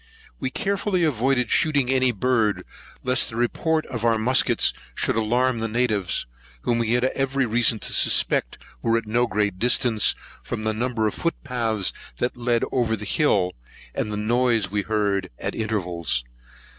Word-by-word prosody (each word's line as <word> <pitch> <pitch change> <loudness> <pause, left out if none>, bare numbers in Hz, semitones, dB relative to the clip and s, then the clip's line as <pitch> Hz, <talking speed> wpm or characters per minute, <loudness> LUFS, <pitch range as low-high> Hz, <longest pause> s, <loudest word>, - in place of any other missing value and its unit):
We 130 - -2
carefully 195 +3 -1
avoided 130 -4 +1
shooting 145 -5 +2
at 135 - +3
any 130 -1 +3
bird, 115 -1 0 0.4
lest 130 0 +2
the 110 - -8
report 155 +7 0
of 120 -4 -6
the 115 -1 +2
muskets 125 +4 +3 0.2
should - - 0
alarm 120 +2 +1
the 115 - -1
natives, 110 -5 0 0.4
whom 120 -1 +1
we 115 0 0
had 125 0 +2
every 135 0 0
reason 115 0 +3
to - - -2
suspect - - +3 0.2
were 115 0 +2
at 115 - -3
no 120 +3 +1
great 105 -4 -1
distance, 120 -2 +3 0.3
from 110 -2 -5
the 110 0 0
number 115 0 -1
of 105 - 0
foot 170 - -2
paths 115 -7 -1 0.2
that 125 - -1
led 120 -1 0
over 120 -3 +1
the 105 -1 -8
hill, 100 -6 +1 0.4
and 105 - -3
the 105 - -3
noise 115 -2 +1
we 105 0 0
heard 100 -2 -1
at - - -4
intervals. 90 - -2
115 Hz, 170 wpm, -23 LUFS, 105-125 Hz, 0.4 s, at